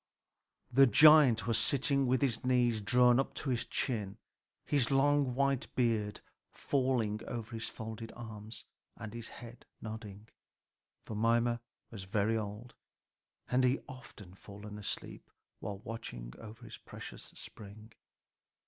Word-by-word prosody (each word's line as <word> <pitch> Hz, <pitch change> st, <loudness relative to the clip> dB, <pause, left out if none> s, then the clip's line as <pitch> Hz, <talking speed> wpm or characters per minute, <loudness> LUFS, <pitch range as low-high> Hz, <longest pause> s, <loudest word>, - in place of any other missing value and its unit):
The 135 Hz, +2 st, +7 dB
giant 135 Hz, -3 st, +7 dB
was 115 Hz, -1 st, +2 dB
sitting 140 Hz, +1 st, +2 dB
with 130 Hz, +2 st, +2 dB
his 125 Hz, -5 st, 0 dB
knees 120 Hz, -3 st, +2 dB
drawn 125 Hz, +3 st, +5 dB
up 135 Hz, -, -1 dB
to 140 Hz, -, -2 dB
his 120 Hz, -2 st, -1 dB
chin, 105 Hz, -6 st, -2 dB, 0.5 s
his 140 Hz, -5 st, +2 dB
long 140 Hz, -1 st, +3 dB
white 140 Hz, -1 st, +1 dB
beard 110 Hz, -4 st, 0 dB, 0.3 s
falling 125 Hz, -6 st, 0 dB
over 115 Hz, -1 st, -5 dB
his 115 Hz, -1 st, -4 dB
folded 110 Hz, 0 st, -7 dB
arms, 110 Hz, -2 st, -9 dB, 0.3 s
and 110 Hz, 0 st, -7 dB
his 115 Hz, -1 st, -6 dB
head 120 Hz, 0 st, -12 dB
nodding; 110 Hz, -1 st, -8 dB, 0.8 s
for -, -, -6 dB
Mimer 115 Hz, +2 st, +2 dB, 0.3 s
was 100 Hz, -5 st, -7 dB
very 105 Hz, +3 st, +1 dB
old, 110 Hz, +3 st, -5 dB, 0.8 s
and 125 Hz, +1 st, +3 dB
he 125 Hz, +2 st, +3 dB
often 125 Hz, -8 st, -11 dB
fell 100 Hz, +1 st, -12 dB
asleep 105 Hz, -1 st, -6 dB, 0.3 s
while 100 Hz, -2 st, -5 dB
watching 80 Hz, -, -7 dB
over 110 Hz, 0 st, -11 dB
his -, -, -10 dB
precious -, -, -9 dB
spring. 110 Hz, +2 st, -11 dB
115 Hz, 130 wpm, -33 LUFS, 105-125 Hz, 0.8 s, The